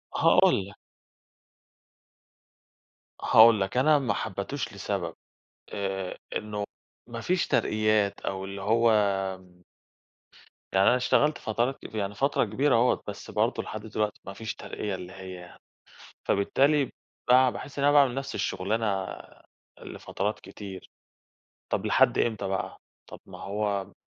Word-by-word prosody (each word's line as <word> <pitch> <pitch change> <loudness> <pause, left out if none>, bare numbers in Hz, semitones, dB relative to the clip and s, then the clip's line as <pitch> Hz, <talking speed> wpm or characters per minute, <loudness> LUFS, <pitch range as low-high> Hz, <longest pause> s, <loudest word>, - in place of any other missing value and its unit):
هاقول 95 - +4
لَك. 100 - -13 2.5
هاقول 110 -2 +7
لَك 95 +5 -2
أنا 150 +3 +5
ما 125 -7 0
حبيتوش 110 +8 -4
لسبب، 100 -4 -3 0.6
آآ 95 -2 -3 0.2
إنّه 105 -1 -3 0.4
ما 115 -1 -6
فيش 180 +7 0
ترقيات 110 -2 +1
أو 95 0 -4
اللي 100 0 -7
هو 115 +3 +3 1.8
يعني 95 +1 +4
أنا - - +6
اشتغلت 145 +4 +2
فترات 120 +5 -1
كت - - -10
يعني 105 -1 -2
فترة 140 +7 +1
كبيرة 125 +5 +2
أهوّة، 120 +2 +2
بس - - -7
برضه - - 0
لحد 110 - -6
دلوقتي 105 -1 -2
مفيش 100 +3 -6
ترقية 105 -2 -5
اللي 90 0 -9
هي، 95 -2 -10 0.7
فبالتالي 140 +8 +2 0.4
بقى 130 +1 +6
باحس 140 +3 -8
إن 140 - +2
أنا 145 - +5
باعمل 140 -4 +5
نفس 135 0 -4
الشغلانة 100 0 -1 0.8
لفترات 105 +3 -4
كتير، 95 -1 -10 0.8
طب - - -1
لحد - - +4
إمتى 110 -3 0
بقى، 95 0 -3 0.3
طب - - -11
ما - - -11
هو 100 -1 -2
105 Hz, 125 wpm, -27 LUFS, 100-125 Hz, 2.5 s, هاقول